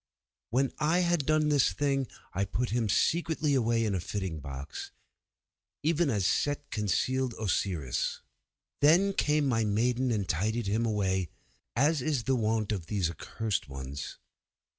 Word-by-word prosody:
When 130 +3 +1
I 160 +4 +3
had 175 -5 +1
done 155 -1 +3
this 145 -3 +3
thing 140 -2 0 0.3
I 95 - 0
put 115 +5 -2
him 115 -2 0
secretly 160 - +1
away 115 -3 +2
in 105 - 0
a 95 - 0
fitting 90 -2 -4
box, 70 0 -7 0.9
even 165 0 +2
as 100 -6 +1
Set 145 +8 0
concealed 125 +4 0
Osiris. 90 - -1 0.6
Then 175 +7 +5
came 150 -5 +2
my 115 -4 +2
maidens 120 +4 +1
and 100 -3 -2
tidied 110 +8 0
him 110 +4 +1
away, 95 -5 0 0.5
as 145 +4 +3
is 145 -4 0
the 135 +2 +1
wont 110 -2 0
of 95 -6 -3
these 95 -6 0
accursed 105 +1 -3
ones. 70 +1 -6
115 Hz, 145 wpm, -30 LUFS, 100-145 Hz, 0.9 s, Then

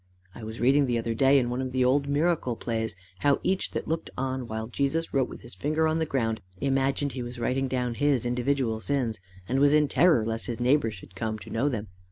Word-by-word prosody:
I - - -10
was 110 +1 -7
reading 135 +3 +4
the 120 -1 +1
other 115 0 -1
day, 135 +4 +5
in 120 -2 +1
one 125 +1 -1
of 130 -1 -3
the 130 -1 +2
old 140 +3 +2
Miracle 145 -3 +1
Plays, 115 -3 -3 0.2
how 140 +3 +3
each 190 0 0
that - - -4
looked 160 +1 -2
on 130 -1 -2
while 110 0 -4
Jesus 140 +7 -1
wrote 135 -2 +2
with - - -10
his - - -10
finger 155 +11 0
on 160 +1 +1
the 160 - 0
ground, 115 -6 -1 0.2
imagined 135 +1 +1
he 130 - -5
was 120 +1 -6
writing 130 +3 0
down 125 -2 -1
his 140 -1 +1
individual 125 -1 0
sins, 120 -3 -1 0.3
and 130 +3 +1
was 145 +1 +5
in 150 -1 +4
terror 155 -8 +4
lest 115 0 -3
his 120 -2 -4
neighbour 125 0 +3
should 95 -3 -11
come 110 +2 -2
to 105 - -11
know 130 +6 +1
them. 110 -5 -3
130 Hz, 235 wpm, -27 LUFS, 115-140 Hz, 0.3 s, day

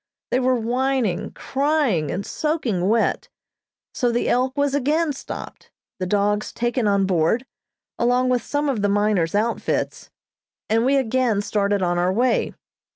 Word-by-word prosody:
They 250 - +2
were 255 0 +2
whining, 245 -3 0
crying, 275 - 0
and 195 +2 -3
soaking 240 - -1
wet; 225 +1 +1 0.6
so 245 -5 +1
the 235 - 0
"Elk" 255 +3 +1
was 285 -1 +1
again 295 +3 +1
stopped, 265 - -8 0.3
the 185 - -2
dogs 205 +2 0
taken 240 -1 -1
on 200 -1 +2
board, 185 +7 +1 0.5
along 245 +1 +2
with 250 -1 +2
some 290 +5 -2
of 255 -7 0
the 205 - +2
miners' 200 -4 +1
outfits, 225 +3 -1 0.6
and 225 +2 +3
we 275 +2 +3
again 250 -4 +1
started 200 -2 0
on 175 0 +1
our 180 +1 +2
way. 240 +4 +1
235 Hz, 150 wpm, -22 LUFS, 200-265 Hz, 0.6 s, and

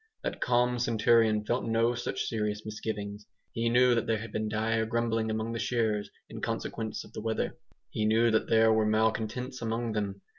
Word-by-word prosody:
That - - -4
calm 125 0 +2
centurion 115 -2 +3
felt 120 +3 0
no 115 +1 +2
such 120 - -3
serious 105 -1 -2
misgivings. 105 -1 -5 0.2
He 115 0 0
knew 125 +1 +5
that 115 - 0
there 115 - +2
had 110 0 -7
been 110 0 -2
dire 110 +1 0
grumbling 115 0 0
among 110 +1 -2
the 115 - -3
shearers 110 -4 0 0.2
in - - -8
consequence 110 -1 -3
of - - -16
the - - -5
weather. 110 0 -2 0.4
He 110 - -1
knew 115 +2 +4
that 110 - +1
there 110 0 +5
were 110 -1 +2
malcontents 110 +4 0
among 115 0 -2
them. 100 -2 -3
110 Hz, 185 wpm, -29 LUFS, 110-115 Hz, 0.4 s, knew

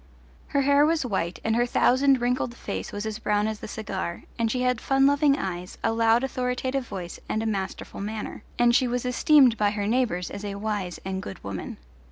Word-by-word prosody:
Her 280 - +1
hair 280 +1 +4
was 315 -2 +2
white, 185 -6 -2
and 225 0 +1
her 240 +1 +2
thousand 260 +2 +3
wrinkled 245 0 0
face - - -5
was 205 +1 -4
as 220 +1 -4
brown 210 -1 +1
as 215 -1 -3
the - - -7
cigar, 190 -5 -4 0.2
and 230 -1 +2
she 250 +2 -1
had 250 -2 +1
fun 270 0 +3
loving 285 0 +4
eyes, 180 -1 -5
a 225 - +2
loud 230 +2 +3
authoritative 255 0 -2
voice 175 -3 -6
and 220 - 0
a - - -3
masterful 195 -2 -4
manner, 210 +1 -5 0.2
and 240 0 +4
she 255 - +3
was 245 +1 -2
esteemed 255 -1 +5
by 205 -1 +3
her 205 0 -2
neighbours 215 -6 0
as 200 - -7
a 200 -1 -4
wise 200 -4 -3
and 190 0 -3
good 100 - -8
woman. 100 -2 -5
225 Hz, 210 wpm, -26 LUFS, 205-255 Hz, 0.2 s, esteemed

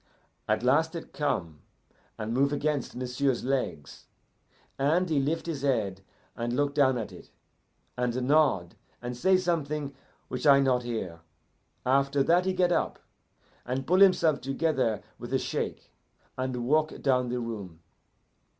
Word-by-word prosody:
At 110 +1 +1
last 160 +6 +2
it 165 - -7
come 85 - -2 0.6
and 110 +1 -3
move 140 +3 +2
against 145 -2 -1
m'sieu's 125 +1 -1
legs, 130 - -3 0.7
and 160 +7 +2
he 155 -4 +1
lift 150 +5 -1
his 160 -5 -4
head 110 -9 0 0.3
and 120 0 -2
look 145 +1 +1
down 135 -3 +3
at 110 - -4
it, - - -13 0.7
and 125 0 -1
nod, 130 - +2 0.3
and 120 0 -5
say 185 +9 +4
something 150 -5 -1 0.3
which 125 +4 -2
I 140 -1 +8
not 130 -2 +2
hear. 110 -9 -4 0.7
After 140 +2 +3
that 175 +5 +3
he 190 - +1
get 180 -1 +2
up, - - 0 0.7
and 130 +2 -3
pull 180 +5 +3
himself 175 -6 +5
together 135 -5 0 0.2
with - - -8
a - - +4
shake, - - -4 0.4
and 130 -2 -3
walk 155 +3 +1
down 125 -3 +2
the 125 0 -1
room. 100 -8 -6
135 Hz, 145 wpm, -28 LUFS, 120-150 Hz, 0.7 s, I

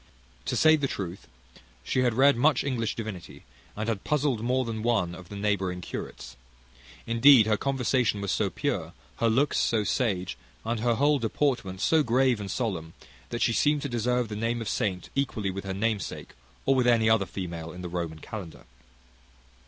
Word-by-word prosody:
To - - -1
say 155 0 +6
the 140 -2 0
truth, 95 - -6 0.6
she 130 - -1
had 120 -3 +2
read 140 +3 +5
much 145 +3 +3
English 120 -6 -1
divinity, 105 -6 -7 0.3
and 105 +1 -3
had 110 -4 -2
puzzled 145 -6 0
more 130 +2 +1
than 110 -1 -4
one 110 -7 +1
of 90 -1 -11
the 100 - -8
neighbouring 100 -3 -1
curates. 65 -7 -7 0.7
Indeed, 115 0 +7
her 110 0 +2
conversation 125 -3 0
was 100 -1 -2
so - - +1
pure, - - -3 0.2
her 115 - +2
looks 135 +6 +2
so 110 -2 +2
sage, 95 - -1 0.3
and 115 0 -1
her 120 +1 +2
whole 145 +3 +3
deportment 115 -5 -1
so 160 -1 +4
grave 125 -2 +2
and 100 -2 -5
solemn, 90 -9 -3 0.3
that 120 - -1
she 115 - +2
seemed 145 +6 +2
to 140 - -3
deserve 120 0 0
the 105 - -4
name 115 +2 -1
of 115 - -5
saint 95 -3 -2
equally 115 -8 -1
with 100 +1 -6
her 95 - -3
namesake, 110 0 -2 0.3
or 135 - +4
with 125 -2 +2
any 115 -2 +4
other 110 -3 +3
female 85 -3 -6
in 90 +2 -9
the - - -3
Roman 85 -2 -4
kalendar. 90 0 -8
115 Hz, 185 wpm, -27 LUFS, 95-125 Hz, 0.7 s, Indeed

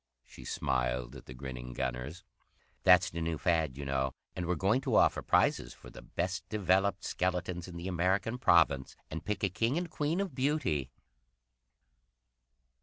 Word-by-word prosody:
She 65 - -13
smiled 60 0 -1
at - - -11
the 65 - -8
grinning 60 -1 -7
gunners. 65 +10 -4 0.6
"That's 90 -1 +6
the 85 - -4
new 80 -1 -1
fad, 80 -5 +1
you 70 - -5
know, 65 -1 -1 0.2
and 90 -1 -3
we're 90 - +1
going 100 +10 +2
to - - 0
offer - - +4
prizes - - +2
for - - -13
the - - -11
best 90 +2 -3
developed 95 -2 +1
skeletons 90 -1 -2
in 85 -2 -8
the 85 +2 -5
American 95 +6 0
Province, 75 - +3 0.2
and 80 0 -5
pick 105 0 -3
a 100 - +3
King 115 - 0
and 175 -1 -3
Queen 155 +4 -1
of 195 -5 -2
Beauty!" 130 - 0
90 Hz, 165 wpm, -31 LUFS, 70-100 Hz, 0.6 s, That's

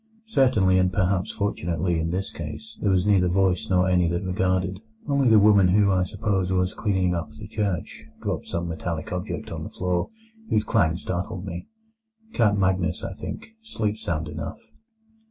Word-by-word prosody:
Certainly, 120 - +3
and 90 0 +2
perhaps 95 -1 +1
fortunately 85 -4 -1
in 80 +1 -1
this 95 +3 -2
case, 85 +8 -7
there 105 - +2
was 95 -1 +3
neither 95 -3 +4
voice 95 0 +1
nor 90 -1 +3
any 90 -2 +3
that 85 +3 -1
regarded: 95 0 0 0.3
only 140 -3 +3
the 110 - +7
woman 100 -2 +6
who, 100 +2 +4
I 90 -1 +2
suppose, 95 -2 -1
was 90 0 +1
cleaning 95 -4 0
up 85 -3 -3
the 75 0 -10
church, 95 -8 -3
dropped - - -3
some 85 0 -2
metallic 80 -1 -4
object 90 0 -4
on - - -5
the - - -6
floor, 90 -1 -1 0.4
whose 110 - +2
clang 85 -6 +2
startled 90 +1 -4
me. 90 -2 -6 0.7
Count 105 -3 +3
Magnus, 95 -3 +1
I 95 - -4
think, 215 - -7
sleeps 110 - -3
sound 80 -2 -2
enough." 75 +1 -5
95 Hz, 170 wpm, -25 LUFS, 85-100 Hz, 0.7 s, the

